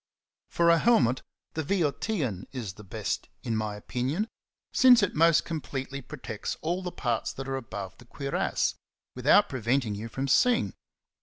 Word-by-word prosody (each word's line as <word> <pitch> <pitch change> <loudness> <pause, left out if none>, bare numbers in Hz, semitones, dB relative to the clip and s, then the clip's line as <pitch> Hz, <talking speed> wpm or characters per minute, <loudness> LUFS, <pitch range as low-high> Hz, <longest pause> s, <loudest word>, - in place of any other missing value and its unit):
For 170 0 +4
a 170 - +5
helmet 130 - +3 0.3
the 160 - -2
Boeotian 150 - -1
^' - - -32
is 115 -8 -5
the 105 - -13
best, 95 - -3
in 115 - -1
my 110 -1 -2
opinion, 130 - -2 0.5
since 250 -4 +7
it 200 - +1
most 165 +1 +4
completely 140 -4 -4
protects - - -5
all 175 +4 -1
the 180 -1 -4
parts 120 -8 -1
that 135 0 -6
are 135 - -2
above 100 -7 -6
the 120 - -14
cuirass, 140 +3 -1 0.4
without - - +5
preventing 120 -2 0
you 110 +3 -5
from 135 +4 -3
seeing. 240 - +3
135 Hz, 160 wpm, -28 LUFS, 115-170 Hz, 0.5 s, since